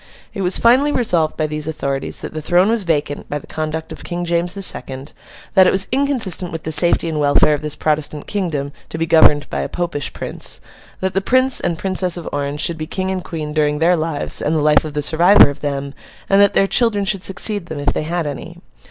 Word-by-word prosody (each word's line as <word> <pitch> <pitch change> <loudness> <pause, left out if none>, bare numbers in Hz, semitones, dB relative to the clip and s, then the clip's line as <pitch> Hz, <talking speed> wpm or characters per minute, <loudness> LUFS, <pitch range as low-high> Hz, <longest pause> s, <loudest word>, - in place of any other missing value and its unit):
It 195 - -5
was 180 0 +5
finally 260 +5 +4
resolved 175 - 0
by 155 - 0
these 150 0 -3
authorities 140 -3 -4
that - - -7
the 155 - -5
throne 175 +5 +2
was 225 -4 +1
vacant 150 -3 -2
by 145 - -2
the 145 - -10
conduct 160 +1 -5
of - - -9
King 175 0 -4
James 170 +1 -1
the 195 - -3
Second; 135 -6 -3 0.4
that 190 -2 +6
it - - +4
was 190 +1 +2
inconsistent 245 - +1
with 165 -1 -6
the 160 - -4
safety 170 +1 +3
and 160 -2 -2
welfare 145 +1 +3
of 145 - -2
this 150 -1 -3
Protestant 150 -1 -2
kingdom, 160 -9 -3 0.2
to - - -6
be 165 - -1
governed 155 -3 +4
by - - -2
a - - -4
Popish 170 -5 -3
prince; - - -3 0.4
that 190 0 -1
the 195 - 0
Prince 255 +5 +3
and 170 - -2
Princess 185 -1 0
of 175 - -7
Orange 145 +1 -3
should 170 -2 -1
be 155 - -5
King 190 +3 -3
and 185 -1 -3
Queen 155 -2 -6
during 150 -1 +1
their 170 +3 +3
lives 155 -3 -1
and 155 - 0
the 155 - +1
life 150 -2 +4
of 155 -2 -7
the 150 - -1
survivor 170 +2 +5
of 140 - -12
them; 140 -1 -4 0.3
and 195 +1 +4
that 200 - +3
their 195 - +4
children 205 -1 +1
should 195 -1 -1
succeed 200 -1 0
them, 160 - -6
if 145 0 -1
they - - -2
had 165 +2 -3
any. 160 +5 -7
165 Hz, 235 wpm, -18 LUFS, 150-190 Hz, 0.4 s, that